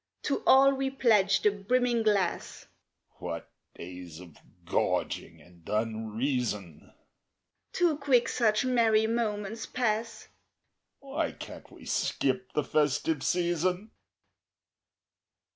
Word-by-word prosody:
_) -, -, -50 dB
To 280 Hz, -, -1 dB
all 275 Hz, +1 st, +7 dB
we 270 Hz, 0 st, -1 dB
pledge 210 Hz, -7 st, +3 dB
the 210 Hz, -, +5 dB
brimming 235 Hz, +4 st, +1 dB
glass! 205 Hz, -5 st, 0 dB, 0.5 s
(What -, -, -6 dB, 0.2 s
days 90 Hz, -2 st, -9 dB
of 85 Hz, -4 st, -13 dB, 0.3 s
gorging -, -, -1 dB
and 85 Hz, -1 st, -19 dB
unreason!) 110 Hz, -, -2 dB, 0.8 s
Too 340 Hz, -4 st, +2 dB
quick 265 Hz, -4 st, +3 dB
such 220 Hz, -1 st, +1 dB
merry 225 Hz, -3 st, +3 dB
moments 220 Hz, -1 st, -2 dB
pass 225 Hz, -2 st, -2 dB, 0.8 s
(_Why 280 Hz, +4 st, -3 dB
can't -, -, -10 dB
we -, -, -14 dB
skip 190 Hz, -1 st, -1 dB
the 150 Hz, -, +1 dB
"festive 150 Hz, +1 st, +1 dB
season"? 180 Hz, +4 st, 0 dB
205 Hz, 105 wpm, -29 LUFS, -, 0.8 s, all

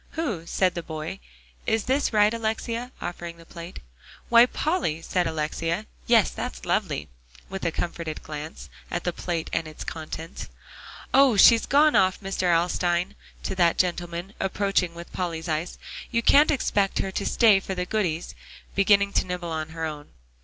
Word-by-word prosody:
"Who?" 220 Hz, -, -3 dB
said 185 Hz, 0 st, +2 dB
the 170 Hz, -, -4 dB
boy; 155 Hz, -1 st, -6 dB, 0.5 s
"is 220 Hz, -1 st, +2 dB
this 275 Hz, +3 st, +1 dB
right, 210 Hz, 0 st, +4 dB
Alexia?" 230 Hz, +2 st, -2 dB
offering 170 Hz, -1 st, -6 dB
the 165 Hz, -, -15 dB
plate. 170 Hz, +2 st, -9 dB, 0.5 s
"Why, 235 Hz, +1 st, +7 dB
Polly," 250 Hz, -, -1 dB
said 180 Hz, 0 st, 0 dB
Alexia; 160 Hz, +1 st, -2 dB, 0.2 s
"yes, -, -, +5 dB
that's -, -, -6 dB
lovely," 75 Hz, -, -1 dB, 0.4 s
with 195 Hz, 0 st, -6 dB
a 165 Hz, -, +1 dB
comforted 170 Hz, -2 st, -4 dB
glance 155 Hz, +1 st, -7 dB, 0.2 s
at 175 Hz, -, -3 dB
the 175 Hz, -, -1 dB
plate 170 Hz, -2 st, -3 dB
and 165 Hz, -1 st, 0 dB
its 155 Hz, -, -8 dB
contents. 160 Hz, +1 st, -6 dB, 0.7 s
"Oh! 270 Hz, -5 st, +6 dB
she's 230 Hz, +2 st, +7 dB
gone 295 Hz, +2 st, +5 dB
off, 185 Hz, 0 st, +3 dB
Mr. 190 Hz, -2 st, 0 dB
Alstyne," 175 Hz, +2 st, +1 dB, 0.3 s
to -, -, -2 dB
that 175 Hz, -3 st, +3 dB
gentleman, 175 Hz, +1 st, -1 dB
approaching 195 Hz, -3 st, 0 dB
with 170 Hz, 0 st, -10 dB
Polly's 165 Hz, -3 st, -3 dB
ice. 160 Hz, +2 st, -2 dB, 0.3 s
"You 235 Hz, -1 st, 0 dB
can't 290 Hz, +5 st, +6 dB
expect 205 Hz, -8 st, +1 dB
her 195 Hz, -, -1 dB
to 200 Hz, -, -2 dB
stay 215 Hz, -2 st, +5 dB
for 190 Hz, 0 st, -5 dB
the 180 Hz, 0 st, -2 dB
goodies," 180 Hz, -5 st, -1 dB, 0.4 s
beginning 200 Hz, 0 st, +4 dB
to -, -, +2 dB
nibble 175 Hz, -2 st, -4 dB
at 155 Hz, 0 st, -3 dB
her 160 Hz, 0 st, -4 dB
own. 150 Hz, -2 st, -6 dB
180 Hz, 165 wpm, -25 LUFS, 165-205 Hz, 0.7 s, Why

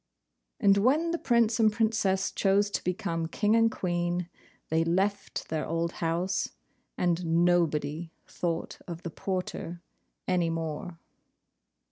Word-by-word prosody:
And 200 Hz, -1 st, +5 dB
when 290 Hz, +11 st, +3 dB
the 340 Hz, -, -1 dB
Prince 235 Hz, -1 st, +2 dB
and 220 Hz, -1 st, +5 dB
Princess 210 Hz, -3 st, +1 dB
chose 200 Hz, +1 st, +2 dB
to -, -, -2 dB
become 165 Hz, -2 st, -1 dB
King 210 Hz, +6 st, +2 dB
and 225 Hz, 0 st, +5 dB
Queen, 175 Hz, -1 st, -1 dB, 0.4 s
they 160 Hz, +1 st, +2 dB
left 195 Hz, +4 st, -1 dB
their 155 Hz, -1 st, -1 dB
old 165 Hz, +1 st, -1 dB
house, 175 Hz, +3 st, 0 dB, 0.5 s
and 175 Hz, 0 st, +1 dB, 0.2 s
nobody 160 Hz, -2 st, +1 dB
thought 170 Hz, -2 st, -3 dB
of 170 Hz, -1 st, -7 dB
the 170 Hz, -, -4 dB
porter 180 Hz, -1 st, -4 dB, 0.4 s
any 180 Hz, -2 st, +2 dB
more. 165 Hz, +1 st, -4 dB
180 Hz, 125 wpm, -29 LUFS, 165-205 Hz, 0.5 s, And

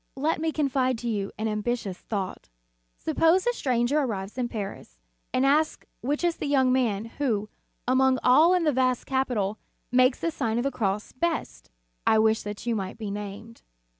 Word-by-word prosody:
Let 310 Hz, +3 st, 0 dB
me 320 Hz, 0 st, +1 dB
confide 265 Hz, -4 st, +1 dB
to 240 Hz, -, -5 dB
you 205 Hz, -3 st, -2 dB
an 220 Hz, +1 st, -1 dB
ambitious 215 Hz, -2 st, -2 dB
thought: 195 Hz, -, -5 dB, 0.5 s
Suppose 330 Hz, -, +2 dB
a 485 Hz, -, +2 dB
stranger 255 Hz, -, +1 dB
arrives 205 Hz, -7 st, -3 dB
in 245 Hz, -2 st, -2 dB
Paris, 200 Hz, -, -6 dB, 0.3 s
and 255 Hz, +1 st, +2 dB
asks 300 Hz, +3 st, +2 dB, 0.2 s
which 290 Hz, +7 st, -1 dB
is 345 Hz, -1 st, +1 dB
the -, -, -3 dB
young 265 Hz, -3 st, +3 dB
man, 225 Hz, -5 st, +1 dB
who, 230 Hz, -4 st, -2 dB, 0.4 s
among 260 Hz, +1 st, +4 dB
all 315 Hz, +8 st, +6 dB
in 360 Hz, -, +1 dB
this 305 Hz, -2 st, +2 dB
vast 255 Hz, -1 st, +1 dB
capital, 240 Hz, -6 st, -1 dB, 0.3 s
makes 255 Hz, +1 st, +4 dB
the 335 Hz, -, -1 dB
Sign 230 Hz, -7 st, -1 dB
of 240 Hz, -, +1 dB
the 275 Hz, -, 0 dB
Cross 205 Hz, -3 st, -2 dB
best. 295 Hz, -, -3 dB, 0.4 s
I 220 Hz, -, +5 dB
wish 220 Hz, 0 st, +3 dB
that 205 Hz, +2 st, -7 dB
you 235 Hz, -1 st, 0 dB
might 195 Hz, -1 st, -4 dB
be 215 Hz, -3 st, -5 dB
named. 205 Hz, +3 st, -7 dB
245 Hz, 180 wpm, -26 LUFS, 210-275 Hz, 0.5 s, all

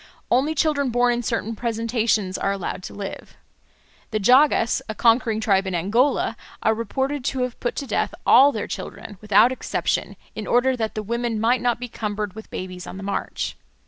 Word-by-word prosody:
Only 280 Hz, +6 st, +2 dB
children 290 Hz, -3 st, +1 dB
born 245 Hz, 0 st, +3 dB
in 240 Hz, -, -1 dB
certain 230 Hz, -1 st, -2 dB
presentations 225 Hz, -4 st, 0 dB
are 195 Hz, -, 0 dB
allowed 195 Hz, -2 st, -4 dB
to -, -, -8 dB
live. 200 Hz, -1 st, -7 dB, 0.7 s
The 215 Hz, -, -1 dB
Jagas, 250 Hz, +2 st, +4 dB
a 220 Hz, -, -3 dB
conquering 230 Hz, 0 st, +3 dB
tribe 195 Hz, -3 st, +2 dB
in 190 Hz, -, -2 dB
Angola, 225 Hz, -, +1 dB, 0.3 s
are 220 Hz, -, +4 dB
reported 265 Hz, +5 st, -2 dB
to 260 Hz, -2 st, 0 dB
have 250 Hz, -1 st, -4 dB
put 240 Hz, -, -2 dB
to 280 Hz, -, -3 dB
death -, -, -1 dB
all 280 Hz, +2 st, +7 dB
their -, -, -3 dB
children, 205 Hz, -4 st, -7 dB
without 210 Hz, +3 st, +5 dB
exception, 260 Hz, -, -2 dB, 0.2 s
in -, -, -6 dB
order 255 Hz, +2 st, +3 dB
that 220 Hz, -3 st, -3 dB
the 215 Hz, -, -3 dB
women 235 Hz, +1 st, -2 dB
might 235 Hz, +2 st, +2 dB
not 240 Hz, -1 st, +1 dB
be 245 Hz, -, -5 dB
cumbered 210 Hz, -3 st, -4 dB
with 220 Hz, +2 st, -10 dB
babies 185 Hz, -1 st, -6 dB
on -, -, -7 dB
the 195 Hz, -, -7 dB
march. 200 Hz, 0 st, -3 dB
230 Hz, 185 wpm, -23 LUFS, 210-250 Hz, 0.7 s, all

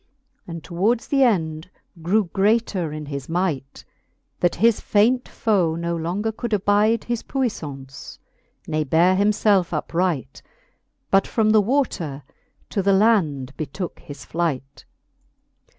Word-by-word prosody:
And 170 Hz, -2 st, -7 dB
towards 205 Hz, +7 st, 0 dB
th'end 185 Hz, -, +1 dB, 0.3 s
grew 200 Hz, +7 st, +2 dB
greater 200 Hz, -5 st, +1 dB
in 150 Hz, 0 st, -6 dB
his 140 Hz, -1 st, -6 dB
might, 160 Hz, -6 st, -2 dB, 0.5 s
That 175 Hz, -, +2 dB
his 225 Hz, +2 st, +3 dB
faint 240 Hz, +5 st, +2 dB
foe 185 Hz, -8 st, +1 dB
no 170 Hz, 0 st, -2 dB
longer 180 Hz, +7 st, -2 dB
could 225 Hz, +1 st, -5 dB
abide 210 Hz, +3 st, +2 dB
His 240 Hz, -1 st, -2 dB
puiflance, 145 Hz, -, -5 dB, 0.5 s
ne 155 Hz, -1 st, 0 dB
beare 170 Hz, +6 st, +3 dB
him 200 Hz, +2 st, +3 dB
felfe 205 Hz, -4 st, +2 dB
upright. 165 Hz, -3 st, -2 dB, 0.7 s
But 195 Hz, 0 st, +4 dB
from 215 Hz, -2 st, +2 dB
the 215 Hz, -1 st, +5 dB
water 195 Hz, -, -1 dB, 0.5 s
to 200 Hz, -, 0 dB
the 195 Hz, +1 st, +3 dB
land 160 Hz, -, +2 dB
betooke 160 Hz, +5 st, -5 dB
his 140 Hz, -4 st, -11 dB
flight. 140 Hz, -4 st, -3 dB
180 Hz, 125 wpm, -22 LUFS, 155-215 Hz, 0.7 s, the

